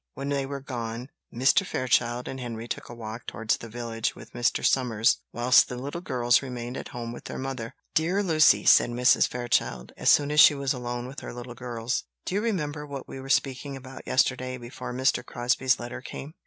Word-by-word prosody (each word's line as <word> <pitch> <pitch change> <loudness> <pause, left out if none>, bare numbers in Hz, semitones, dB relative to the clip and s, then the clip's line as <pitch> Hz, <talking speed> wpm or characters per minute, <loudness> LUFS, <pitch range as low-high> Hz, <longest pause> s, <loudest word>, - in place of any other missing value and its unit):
When 140 - -4
they 140 -1 -1
were 140 0 -5
gone, 120 -1 -5 0.2
Mr. 135 - +3
Fairchild 125 - 0
and 130 - -5
Henry 115 -2 -5
took - - -5
a - - -7
walk 115 0 -8
towards 115 0 -1
the 115 - -9
village 115 -1 -3
with - - -13
Mr. 120 -1 0
Somers, 115 -4 +3
whilst 120 +1 +5
the 125 - -5
little 140 +7 -5
girls 120 -7 +2
remained 125 -2 -6
at - - -5
home 120 -3 -6
with 120 - -10
their - - -6
mother. 130 -4 -5 0.2
"Dear 180 +6 +2
Lucy," 160 -4 +5
said - - +6
Mrs. 125 +2 +4
Fairchild, 120 - -1
as - - +2
soon 145 0 +5
as 150 - +3
she 150 - +9
was 140 -1 0
alone 120 -1 -4
with 130 +2 -7
her - - -8
little 120 0 -7
girls, 120 -1 -3 0.2
"do - - -3
you 205 - +1
remember 155 -10 -2
what 140 -2 -7
we 135 - -8
were 135 +1 -9
speaking 135 0 0
about 130 0 -11
yesterday, 130 0 +1
before 120 0 -7
Mr. 130 +2 +1
Crosbie's 125 +2 +1
letter 120 +1 -6
came?" 140 +3 -8
125 Hz, 205 wpm, -27 LUFS, 120-140 Hz, 0.2 s, she